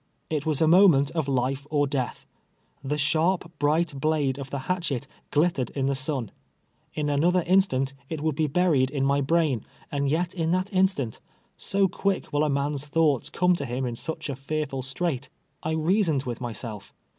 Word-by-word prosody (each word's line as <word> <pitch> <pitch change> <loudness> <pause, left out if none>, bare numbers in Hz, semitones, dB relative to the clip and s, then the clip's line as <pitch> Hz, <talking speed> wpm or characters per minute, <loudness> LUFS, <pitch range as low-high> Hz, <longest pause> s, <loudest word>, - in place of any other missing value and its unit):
It 155 0 -1
was 155 0 +2
a - - +4
moment 165 -5 +6
of 160 -4 -1
life 135 +1 -1
or 145 -1 +2
death. 135 -3 -3 0.6
The 145 +2 -1
sharp, 165 +4 +1
bright 155 +2 +2
blade 145 -3 +1
of 135 -1 -6
the 140 0 -4
hatchet 165 -8 -1 0.2
glittered 150 -5 +1
in 135 -2 0
the 140 - +1
sun. 135 -3 -1 0.6
In 150 -1 -1
another 170 +5 +2
instant 155 -8 +2 0.2
it 160 - -3
would 155 +1 0
be 155 +2 0
buried 145 -4 +2
in 135 -1 -1
my 140 +1 +2
brain, 145 -5 +1 0.3
and 140 -1 0
yet 170 +4 0
in 165 -3 -1
that 185 +2 -1
instant 185 - +1 0.2
— - - -40
so 195 0 +1
quick 195 0 -2
will 145 +1 +2
a 155 - +1
man's 140 +1 -1
thoughts 150 -4 +2
come 180 0 +2
to 140 - -3
him 125 +2 -2
in 120 -1 -3
such 160 +7 -5
a 140 - -3
fearful 140 0 -3
strait 135 0 -2 0.2
— - - -45
I 160 - -2
reasoned 160 -3 +2
with 125 -2 -5
my 120 -1 -3
self. 110 -3 -7
145 Hz, 190 wpm, -26 LUFS, 135-165 Hz, 0.6 s, moment